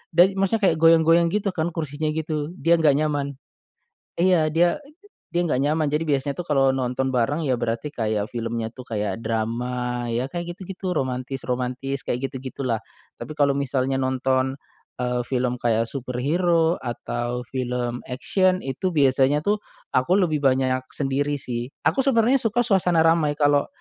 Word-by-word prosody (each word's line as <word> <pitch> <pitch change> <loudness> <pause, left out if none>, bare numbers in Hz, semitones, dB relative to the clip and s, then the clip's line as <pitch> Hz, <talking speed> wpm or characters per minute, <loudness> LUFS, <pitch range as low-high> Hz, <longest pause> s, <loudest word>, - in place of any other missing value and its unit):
dan 180 +3 +6
maksudnya 200 +2 +1
kayak 160 - -3
goyang-goyang 165 +1 +5
gitu 200 +2 0
kan 165 -2 -1
kursinya, 155 -1 -3
gitu. 155 0 -3
Dia 170 -2 +3
enggak 150 -3 +4
nyaman 145 -2 -1 0.8
Iya, 175 -3 +4
dia 170 +2 +2 0.6
dia 175 - +2
enggak 150 -7 0
nyaman 155 -1 +1
jadi 155 +2 -1
biasanya 140 +1 -1
tuh 175 - -4
kalau 135 -2 +3
nonton 130 0 -1
bareng 130 +6 0
ya 130 -5 0
berarti 115 +4 -2
kayak 110 -5 -2
filmnya 115 -1 -3
tuh 125 +1 -12
kayak 105 -3 -2
drama, 120 +2 -2
ya 120 +3 -2
kayak 175 0 -4
gitu-gitu, 185 -1 -5
romantis-romantis 130 0 -3
kayak 130 +2 -2
gitu-gitu 130 0 -7
lah. 115 -3 0 0.4
Tapi 155 - -7
kalau 145 -2 +3
misalnya 135 -1 0
nonton, 130 0 0 0.4
eee, 125 0 -1
film 125 -1 -1
kayak 115 -1 +1
superhero 160 +7 +1
atau 120 0 -4
film 125 -2 -2
action 185 +8 +1
itu 160 +7 -3
biasanya 140 +1 +3
tuh, 210 +5 +1 0.3
aku 130 +8 +2
lebih 175 -6 +2
banyak 130 -1 +1
sendiri 145 +1 0
sih. 120 -3 -4 0.2
Aku - - +1
sebenarnya 250 +1 +4
suka 235 +1 +1
suasana 180 -7 +3
ramai 160 -2 +3
kalau, 145 -1 +3
140 Hz, 155 wpm, -23 LUFS, 125-165 Hz, 0.8 s, dan